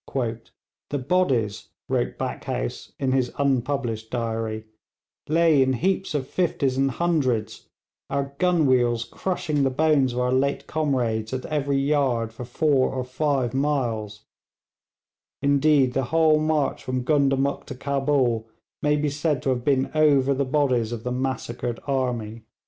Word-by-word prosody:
'The 145 - -1
bodies,' 130 - 0 0.2
wrote - - -1
Backhouse - - -4
in 135 -2 0
his 130 -2 +1
unpublished 130 -5 -1
diary, 115 -2 -3 0.6
'lay 160 -2 +4
in 130 0 +3
heaps 185 +5 -1
of 135 -3 -1
fifties 140 -7 0
and 135 +1 +2
hundreds, 135 -8 -1 0.4
our 140 0 -2
gun 180 -4 +3
wheels 120 -3 +2
crushing 155 -1 -2
the 135 - +3
bones 140 -2 +2
of 125 - -2
our 125 0 +1
late 135 +2 0
comrades 125 -7 -1
at 130 - -3
every 140 -2 0
yard 135 -5 +1
for 120 +2 -7
four 135 +1 +2
or 130 -1 -2
five 130 -1 -1
miles; 115 -7 -1 1.1
indeed, 140 -2 +3
the 135 -1 0
whole 160 +2 +3
march 155 -2 0
from 130 0 -2
Gundamuk 140 -1 +1
to 135 - -6
Cabul 135 -4 0 0.3
may 150 0 +2
be 150 -1 0
said 145 -1 -1
to - - 0
have 125 -2 0
been 135 -1 +1
over 140 -3 +4
the 140 +1 0
bodies 130 -5 +1
of 115 -2 -5
the 125 - -3
massacred 125 -2 -3
army.' 120 -5 -2
135 Hz, 145 wpm, -24 LUFS, 120-145 Hz, 1.1 s, lay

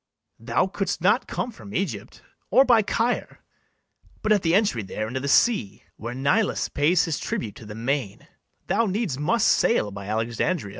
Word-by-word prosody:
Thou 115 +6 +1
couldst 195 +1 -3
not 210 +8 +2
come 245 - -3
from 205 -2 -11
Egypt, 140 - -4 0.3
or 265 - +5
by 240 -3 +5
Caire, 230 +3 -2 0.8
But 215 - +1
at 210 -3 +4
the 165 0 +2
entry 200 - +2
there 110 +2 -4
into 130 +3 -3
the 140 - -4
sea, 175 - +2
Where 120 +2 -6
Nilus 140 - +1
pays 165 +5 +2
his 165 -4 -2
tribute 105 -3 -3
to 110 - -12
the 105 - -8
main, 120 -3 -3 0.4
Thou 230 - +1
needs 190 - -2
must 210 +9 +2
sail 105 - +2
by 100 0 -8
Alexandria. 115 - -1
150 Hz, 170 wpm, -24 LUFS, -, 0.8 s, or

